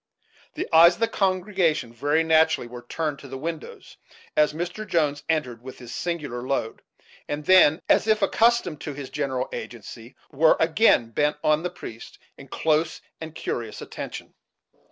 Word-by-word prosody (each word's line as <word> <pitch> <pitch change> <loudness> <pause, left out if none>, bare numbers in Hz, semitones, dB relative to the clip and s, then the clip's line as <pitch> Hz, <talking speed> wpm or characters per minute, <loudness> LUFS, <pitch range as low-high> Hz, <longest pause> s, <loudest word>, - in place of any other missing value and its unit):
The - - -3
eyes 170 +2 +8
of - - -19
the 230 - +2
congregation, 185 - 0
very 145 +6 +1
naturally, 160 -4 +3
were 120 0 -9
turned 155 -4 -3
to 140 - -11
the 135 0 -7
windows, 160 +2 -7 0.4
as 150 0 +4
Mr. 175 +7 -5
Jones 150 -6 0
entered 130 -8 -1
with 130 +1 -10
his 120 -1 -10
singular 150 -8 -4
load; 125 -3 -3 0.5
and 145 0 -4
then, 185 -3 +5
as - - +3
if 215 -2 +2
accustomed 220 -7 +2
to 150 - -5
his 135 -2 -8
"general 135 -3 -2
agency," 115 +1 -9 0.2
were 155 +2 +4
again 160 - +3
bent 150 +5 0
on 155 0 +3
the 180 - -2
priest, 115 -9 -10 0.2
in 135 - -13
close 155 +3 0 0.2
and 160 -1 -8
curious 115 -7 -4
attention. - - -8
150 Hz, 160 wpm, -24 LUFS, 135-170 Hz, 0.5 s, eyes